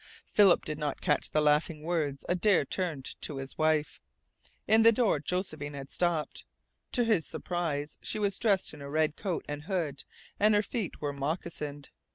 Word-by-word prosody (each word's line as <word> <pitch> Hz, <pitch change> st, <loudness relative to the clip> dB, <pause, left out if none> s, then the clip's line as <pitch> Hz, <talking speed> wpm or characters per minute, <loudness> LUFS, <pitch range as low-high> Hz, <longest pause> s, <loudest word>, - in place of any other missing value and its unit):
Philip 200 Hz, -4 st, +5 dB
did 155 Hz, 0 st, -3 dB
not 150 Hz, -2 st, -2 dB
catch 150 Hz, -5 st, +1 dB
the 155 Hz, -, +2 dB
laughing 150 Hz, +1 st, +2 dB
words 155 Hz, -5 st, -1 dB
Adare 180 Hz, -2 st, +3 dB
turned 160 Hz, -5 st, -3 dB, 0.2 s
to 145 Hz, -, 0 dB
his 135 Hz, 0 st, -6 dB
wife. 155 Hz, -1 st, +1 dB, 0.7 s
In 220 Hz, +1 st, +6 dB
the 230 Hz, +1 st, +8 dB
door 225 Hz, -, +2 dB
Josephine 155 Hz, -3 st, -3 dB
had 135 Hz, -1 st, -8 dB
stopped. 170 Hz, -4 st, -1 dB, 0.5 s
To 245 Hz, -, +4 dB
his 215 Hz, -9 st, +2 dB
surprise 155 Hz, -5 st, -3 dB
she -, -, -2 dB
was 200 Hz, -2 st, 0 dB
dressed 200 Hz, -7 st, +1 dB
in 150 Hz, -, -10 dB
her 140 Hz, 0 st, -7 dB
red 155 Hz, +1 st, +1 dB
coat 190 Hz, -5 st, -3 dB
and 145 Hz, +1 st, -5 dB
hood, 160 Hz, -8 st, -2 dB, 0.4 s
and 210 Hz, +1 st, +5 dB
her 205 Hz, -, +3 dB
feet 215 Hz, -3 st, -4 dB
were 145 Hz, -1 st, -2 dB
moccasined. 145 Hz, 0 st, -4 dB
155 Hz, 175 wpm, -30 LUFS, 145-190 Hz, 0.7 s, the